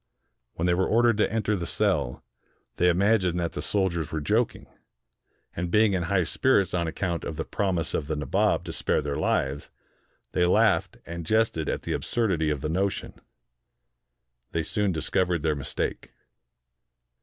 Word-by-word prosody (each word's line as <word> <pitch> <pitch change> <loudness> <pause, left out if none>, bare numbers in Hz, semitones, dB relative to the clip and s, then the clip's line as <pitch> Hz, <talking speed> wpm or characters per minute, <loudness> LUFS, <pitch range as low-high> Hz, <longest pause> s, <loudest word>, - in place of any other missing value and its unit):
When 85 - -1
they 90 - +3
were 95 +2 +1
ordered 115 -1 +3
to - - +2
enter 110 -1 0
the 85 -3 -4
cell, 80 -12 0 0.5
they 90 - +4
imagined 95 -1 +2
that 85 -1 -1
the - - -5
soldiers 90 -6 0
were 80 - -2
joking; 75 - 0 0.9
and, 90 0 -2
being 105 +2 +4
in 90 - 0
high 90 +2 +1
spirits 100 +1 +2
on 85 -2 0
account 85 +1 -2
of 80 - -4
the 80 - -3
promise 90 -5 -1
of 75 - -2
the 80 - -1
Nabob 75 -3 +1
to - - -6
spare - - 0
their 70 -1 -2
lives, 70 +1 -1 0.6
they 90 - +1
laughed 90 - +2
and 85 0 -6
jested 110 -4 +1
at - - -2
the - - -2
absurdity 95 -10 0
of 75 -3 -2
the 75 - -2
notion. 95 +3 -1 1.4
They 85 - 0
soon 100 +4 0
discovered 85 0 0
their 80 -2 +1
mistake. 70 - -3
90 Hz, 165 wpm, -26 LUFS, 80-100 Hz, 1.4 s, they